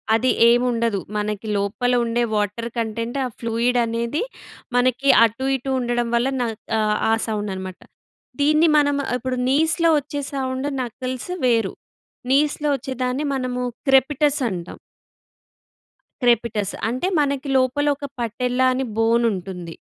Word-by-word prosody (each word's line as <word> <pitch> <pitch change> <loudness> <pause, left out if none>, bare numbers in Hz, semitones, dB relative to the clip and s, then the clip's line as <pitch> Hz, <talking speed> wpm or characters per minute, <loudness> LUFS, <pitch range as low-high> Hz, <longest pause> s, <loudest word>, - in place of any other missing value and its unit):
అది 255 +3 +2 0.2
ఏమి 245 +1 +4
ఉండదు. 230 -4 0 0.2
మనకి 210 +1 -3
లోపల 200 +5 0
ఉండే 235 +1 0
వాటర్ 210 +3 -1
కంటెంట్ 230 +2 -2
ఆ - - -1
ఫ్లూయిడ్ 235 +2 0
అనేది 235 +6 -2 0.6
మనకి 255 +2 +2 0.2
అటు, 230 +4 -3
ఇటు 265 +1 -5
ఉండడం 240 -1 -1
వల్ల 235 +2 +2
న - - +2 0.4
ఆహ్, 210 -1 +1
ఆ - - +4
సౌండన్నమాట. 190 -4 -4 0.6
దీన్ని 305 +3 +4
మనం 285 -1 +3 0.2
ఇప్పుడు 255 +1 -3
నీస్‌లో 320 +4 +3
వచ్చే 285 +1 -5
సౌండ్ 260 0 -2
నకిల్స్ 255 +5 -5
వేరు. 230 -5 +2 0.6
నీస్‌లో 295 +2 +2
వచ్చే, 265 +1 -6
దాన్ని 255 +4 -1
మనము 250 -1 -2 0.3
క్రెపీటస్ 280 +2 +3
అంటాం. 175 -2 -6 1.5
క్రెపిటస్ 230 -4 +1 0.2
అంటే, 255 +10 -1
మనకి 280 -1 0
లోపలొక 285 +3 +1 0.2
పటెల్లా 250 +2 0
అని 265 +1 -1
బోనుంటుంది. 195 -7 0
245 Hz, 125 wpm, -22 LUFS, 225-270 Hz, 1.5 s, ఏమి